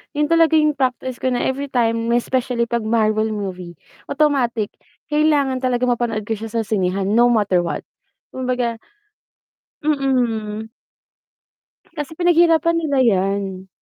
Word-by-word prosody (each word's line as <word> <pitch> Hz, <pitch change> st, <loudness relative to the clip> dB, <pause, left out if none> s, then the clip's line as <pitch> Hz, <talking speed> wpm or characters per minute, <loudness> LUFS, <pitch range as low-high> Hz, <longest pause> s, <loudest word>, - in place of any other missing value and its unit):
yun 300 Hz, +2 st, 0 dB
talaga 330 Hz, -1 st, +4 dB
yung 305 Hz, -1 st, +4 dB
practice 255 Hz, -1 st, -2 dB
ko 260 Hz, -, -1 dB
na 245 Hz, -1 st, 0 dB
everytime 245 Hz, -4 st, -1 dB
may 235 Hz, 0 st, +2 dB
especially 250 Hz, -2 st, -1 dB
'pag 235 Hz, -2 st, -2 dB
Marvel 220 Hz, -1 st, +2 dB
movie, 185 Hz, -4 st, -6 dB, 0.3 s
automatic, 255 Hz, -8 st, 0 dB, 0.4 s
kailangan 295 Hz, -4 st, +2 dB
talagang 250 Hz, -1 st, 0 dB
mapanood 230 Hz, -3 st, -1 dB
ko 220 Hz, 0 st, -3 dB
siya 225 Hz, -, -5 dB
sa 225 Hz, -, +1 dB
sinehan 195 Hz, -2 st, -1 dB
no 240 Hz, +2 st, +5 dB
matter 205 Hz, -6 st, +2 dB
what. 175 Hz, -, -3 dB, 0.5 s
Kumbaga 250 Hz, -3 st, -2 dB, 1.0 s
Mm. 235 Hz, -7 st, -1 dB, 1.2 s
Kasi 300 Hz, 0 st, -6 dB
pinag-hirapan 335 Hz, -1 st, +3 dB
nila 290 Hz, -4 st, -1 dB
yan. 195 Hz, -3 st, 0 dB
240 Hz, 125 wpm, -20 LUFS, 215-275 Hz, 1.2 s, no